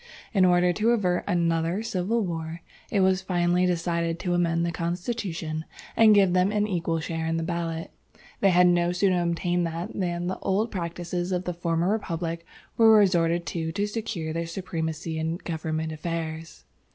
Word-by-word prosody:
In 190 -3 +5
order 180 0 +4
to 215 +5 +1
avert 185 -7 +1
another 170 +1 +1
civil 220 +1 0
war, 165 -1 -5 0.3
it 200 - +1
was 190 0 +3
finally 180 -1 +1
decided 170 -1 0
to 180 0 -2
amend 170 -1 +1
the 170 - -1
constitution, 170 -2 -3 0.3
and 220 -2 +7
give 195 -3 +4
them 185 +2 +3
an 210 0 +1
equal 170 -5 -1
share 160 +1 -3
in 165 0 0
the 165 - -1
ballot. 165 -1 -3 0.5
They 195 - +4
had 180 0 +5
no 175 0 +3
sooner 180 -1 +2
obtained 175 0 0
that 170 +5 -5
than 175 -2 -2
the 185 - -3
old 210 +4 0
practices 175 0 -3
of 180 0 0
the 180 - -3
former 170 +1 0
Republic 170 -5 -2 0.3
were 225 -1 +7
resorted 170 -4 +3
to 160 +1 -3
to 205 +1 0
secure 210 -7 -4
their 165 0 -2
supremacy 165 -2 -4
in 160 +1 -1
government 160 -2 -3
affairs. 160 0 -5
175 Hz, 170 wpm, -26 LUFS, 165-185 Hz, 0.5 s, and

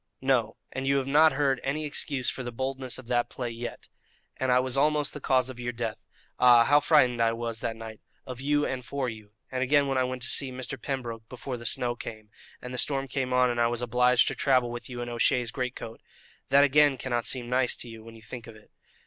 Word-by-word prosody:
"No, 125 -5 +1
and 135 +1 -4
you 140 0 +3
have 135 - 0
not 150 +3 +5
heard 135 -2 +1
any 150 +3 -2
excuse 140 -3 -1
for - - -2
the 120 -1 -5
boldness 130 +1 -3
of 130 - -10
that 120 0 0
play 120 -2 -4
yet. 120 +1 -7 0.5
And 130 -1 0
I 125 - +5
was 130 0 0
almost 150 +1 +2
the 150 - -6
cause 130 -1 +2
of 125 - -12
your 120 0 -3
death. 115 -2 -4 0.4
Ah! 120 -2 +7
how 145 +4 +5
frightened 130 -6 +3
I 115 0 +3
was 115 -1 -4
that 115 - -3
night 110 -1 -9 0.2
of 130 -1 -7
you 145 +1 +1
and 130 -1 -3
for 135 0 -3
you! 110 -2 -11 0.2
And 130 -1 -2
again 140 +2 +3
when 135 -1 0
I - - +3
went 130 -1 -4
to - - -3
see 135 -2 +1
Mr. 130 0 -6
Pembroke 115 -5 -5
before 125 +1 -6
the 120 -1 -6
snow 120 +1 +1
came, 110 -3 -9 0.3
and 125 0 -6
the 125 - -2
storm 135 0 +1
came 130 0 -2
on 125 -1 +3
and 120 0 -1
I 120 - +4
was 120 +1 -2
obliged 125 0 +3
to - - -3
travel 130 -3 +2
with 120 +1 -7
you 120 -1 -6
in 120 - -4
O'Shea's 120 0 +1
great 125 -1 -3
coat 115 - -8 0.5
that 140 +1 +6
again 145 -1 +4
cannot 120 -2 -2
seem 125 -2 -2
nice 125 +1 +2
to - - -6
you 115 -1 -10
when 115 0 -12
you 110 - -15
think 120 +1 -9
of 115 - -11
it. 110 - -19
125 Hz, 245 wpm, -27 LUFS, 120-135 Hz, 0.5 s, Ah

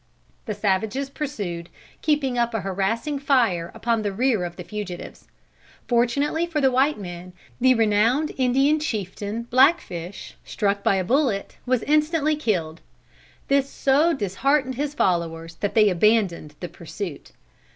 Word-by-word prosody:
The 215 - -2
savages 210 +7 -1
pursued, 200 - -5 0.3
keeping 290 -4 +1
up 235 -1 0
a 220 - -1
harassing 210 +9 -1
fire 235 -12 +2
upon 230 -1 0
the 205 -1 -1
rear 225 -1 +1
of 175 0 -7
the 180 - -8
fugitives. 200 -3 -7 0.6
Fortunately 280 +7 +1
for 325 -3 -1
the 265 -2 +3
white 270 +4 +2
men, 180 -2 -8 0.3
the 255 +1 +5
renowned 225 +7 +2
Indian 270 +4 +3
chieftain 215 - -3
Blackfish, 235 - +1
struck 200 -1 -1
by - - +3
a 190 - 0
bullet, 240 -2 0
was 255 -2 +1
instantly 305 +1 +2
killed. 175 - -2 0.7
This 275 0 +2
so 285 +6 +2
disheartened 260 - 0
his 290 +3 -3
followers, 165 - -1
that 205 - -3
they 215 -2 +6
abandoned 185 -5 +2
the 175 - -3
pursuit. 170 -1 -7
230 Hz, 140 wpm, -23 LUFS, 190-275 Hz, 0.7 s, they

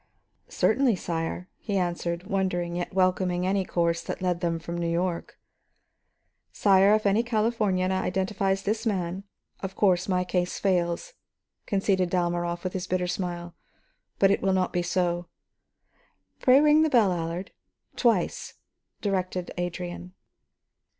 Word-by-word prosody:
"Certainly, 260 -5 +2
sire," 170 0 -3
he 205 -3 -2
answered, 175 -1 -2
wondering, 185 -4 -1
yet 175 0 -3
welcoming 185 -1 +1
any 195 +1 +1
course 170 -2 0
that - - -5
led 180 -2 -1
them 170 -2 0
from 170 +1 -6
New 170 -1 -1
York. 170 0 -2 1.1
"Sire, 195 +1 +5
if 215 - -1
any 200 +3 +4
Californian 215 -5 0
identifies 190 +1 0
this 220 +2 -1
man, 190 -1 -2 0.3
of 190 -1 -6
course 185 -2 +2
my 180 -1 +2
case 180 -1 -1
fails," 180 - 0 0.5
conceded 195 -2 +1
Dalmorov 175 -1 -1
with 185 - -3
his 185 -1 -3
bitter 180 0 0
smile. 175 -1 -4 0.6
"But, 195 0 +4
it 200 - +1
will 195 0 +2
not 185 -1 0
be 175 - +1
so." 175 -1 -1 1.1
"Pray 255 +1 +6
ring 300 +1 +5
the 315 - +3
bell, 220 -9 +4
Allard, 170 +2 -4 0.4
twice," 225 -8 0 0.5
directed 185 -3 -2
Adrian. 175 0 -5
185 Hz, 135 wpm, -26 LUFS, 175-195 Hz, 1.1 s, Pray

